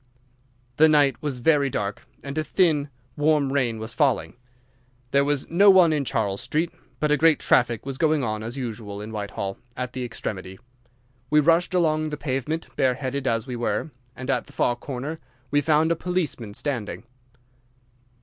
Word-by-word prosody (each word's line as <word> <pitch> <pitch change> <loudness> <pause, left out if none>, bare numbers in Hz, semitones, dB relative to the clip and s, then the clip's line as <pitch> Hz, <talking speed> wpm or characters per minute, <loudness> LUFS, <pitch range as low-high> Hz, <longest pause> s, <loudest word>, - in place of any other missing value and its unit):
"The 160 +1 +7
night 145 -2 +3
was 145 -4 -3
very 140 +2 +3
dark, 100 -4 -4 0.2
and 140 0 -6
a 155 - 0
thin, 155 -4 +2 0.3
warm 145 -2 +2
rain 120 -5 +1
was 110 +1 -5
falling. 140 -6 +1 0.8
There 140 0 +4
was 145 -1 0
no 195 +5 +5
one 180 -4 +6
in 145 -2 0
Charles 100 -4 -1
Street, 155 +7 -1 0.3
but 150 -1 +1
a 150 - +4
great 160 -1 +5
traffic 120 -1 +2
was 135 -1 -5
going 155 -3 +2
on, 110 -2 -2
as 115 +4 -6
usual, 110 -5 -5
in 105 +1 -7
Whitehall, 100 -2 -4 0.2
at 125 0 -4
the 130 - -4
extremity. 95 -5 -5 0.7
We 150 - +5
rushed 170 +4 +3
along 155 -3 +2
the 150 - -4
pavement, 145 +3 -2
bare 130 -1 +2
headed 135 0 -3
as 115 -2 0
we 125 - -5
were, 120 +6 -2 0.2
and 130 - -7
at - - -1
the - - -16
far 120 - +1
corner 140 +5 -5 0.3
we 145 0 +3
found 155 +2 +3
a - - +3
policeman 160 - -3
standing. 120 -8 -3
140 Hz, 175 wpm, -24 LUFS, 120-155 Hz, 0.8 s, The